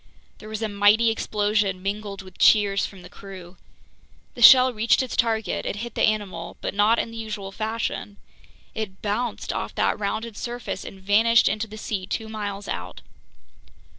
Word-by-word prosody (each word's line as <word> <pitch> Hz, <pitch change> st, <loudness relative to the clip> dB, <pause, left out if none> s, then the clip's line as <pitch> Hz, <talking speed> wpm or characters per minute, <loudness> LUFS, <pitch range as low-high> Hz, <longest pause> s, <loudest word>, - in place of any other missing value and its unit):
There 215 Hz, -, -11 dB
was 220 Hz, +1 st, -4 dB
a -, -, +1 dB
mighty 210 Hz, +3 st, +4 dB
explosion, 205 Hz, -3 st, 0 dB
mingled 200 Hz, 0 st, -4 dB
with 185 Hz, -1 st, -15 dB
cheers 200 Hz, -2 st, +4 dB
from 190 Hz, -3 st, -14 dB
the -, -, -10 dB
crew. 185 Hz, -2 st, -12 dB, 0.8 s
The 240 Hz, -, -9 dB
shell 255 Hz, +1 st, +9 dB
reached 230 Hz, +4 st, +2 dB
its 255 Hz, -, -5 dB
target; 225 Hz, -2 st, 0 dB
it -, -, -3 dB
hit 235 Hz, +2 st, -6 dB
the -, -, -3 dB
animal, 200 Hz, -6 st, -1 dB
but -, -, -4 dB
not 210 Hz, +3 st, +3 dB
in 230 Hz, -, -2 dB
the 230 Hz, -, -9 dB
usual 210 Hz, -3 st, -5 dB
fashion—it 215 Hz, -1 st, -6 dB
bounced 215 Hz, +2 st, -2 dB
off -, -, -4 dB
that -, -, +1 dB
rounded 220 Hz, +2 st, -3 dB
surface 240 Hz, 0 st, -5 dB
and 195 Hz, -, -10 dB
vanished 220 Hz, +4 st, +4 dB
into 215 Hz, +2 st, -1 dB
the 215 Hz, +1 st, -10 dB
sea 200 Hz, -3 st, -4 dB
two 220 Hz, +1 st, -4 dB
miles 205 Hz, -2 st, -5 dB
out. 90 Hz, 0 st, -6 dB
210 Hz, 165 wpm, -24 LUFS, 200-225 Hz, 0.8 s, shell